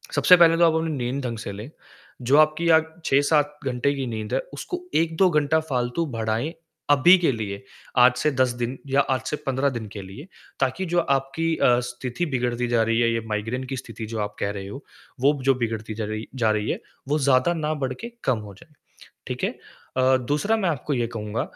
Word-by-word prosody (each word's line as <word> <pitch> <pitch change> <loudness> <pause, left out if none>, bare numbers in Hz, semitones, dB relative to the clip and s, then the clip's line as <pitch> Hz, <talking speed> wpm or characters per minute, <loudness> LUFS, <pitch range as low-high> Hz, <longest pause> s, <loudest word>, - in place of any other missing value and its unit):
सबसे 180 - +7
पहले 165 -1 +6
तो 170 - +4
आप 165 - +4
अपनी 160 0 0
नींद 130 +2 -2
ढंग 115 -2 -3
से 110 - -6
ले 105 +6 -8 0.5
जो 130 +4 +3
आपकी 155 +2 +3
अ, 160 -1 +7 0.3
6-7 145 +1 +2
घंटे 130 +2 0
की 135 - -3
नींद 110 -2 -5
है - - +2
उसको 360 -1 -5
1-2 165 +3 +3
घंटा 150 0 +2
फालतू 125 +5 -1
बढाएँ 115 +8 -1 0.4
अभी 145 +6 +7
के 170 -6 +2
लिए 100 -4 -5 0.3
आज 125 0 +6
से 150 +2 +1
10 130 -1 +2
दिन 120 +2 -2
या 135 +1 +3
आज 130 -2 -1
से - - 0
15 135 +1 +1
दिन 120 -5 -5
के 100 - -6
लिए 100 - -10 0.3
ताकि 135 +8 0
जो 175 - +4
आपकी 140 +2 0
अ, 120 0 +4
स्थिति 125 +5 -4
बिगड़ती 120 0 -1
जा 120 -1 +2
रही 115 +1 +1
है 115 - +3
ये 115 - -1
माइग्रेन 115 +5 -2
की - - -3
स्थिति 115 -2 -7
जो 110 0 -5
आप 105 -1 -3
कह 100 - -1
रहे 100 -1 -6
हो, 135 +8 -8 0.4
वो 140 +3 +5
जो 135 - +4
बिगड़ती 110 -3 -3
जा 110 - -3
रही 110 +1 -5
जा 115 -4 +2
रही 105 0 -1
है, - - -3 0.3
वो 150 +2 +1
ज़्यादा 135 +3 +3
ना 155 -2 -1
बड़ 135 -3 -2
के 235 - -8
कम 125 -4 +1
हो 105 -2 -10
जाए, 150 +10 -19 0.5
ठीक - - -5
है? - - +1 0.5
अ, 130 0 +4
दूसरा 200 +10 +1
मैं 190 -5 0
आपको 150 -1 -2
ये 120 -2 0
कहूँगा 110 -1 -3
130 Hz, 215 wpm, -24 LUFS, 115-150 Hz, 0.5 s, सबसे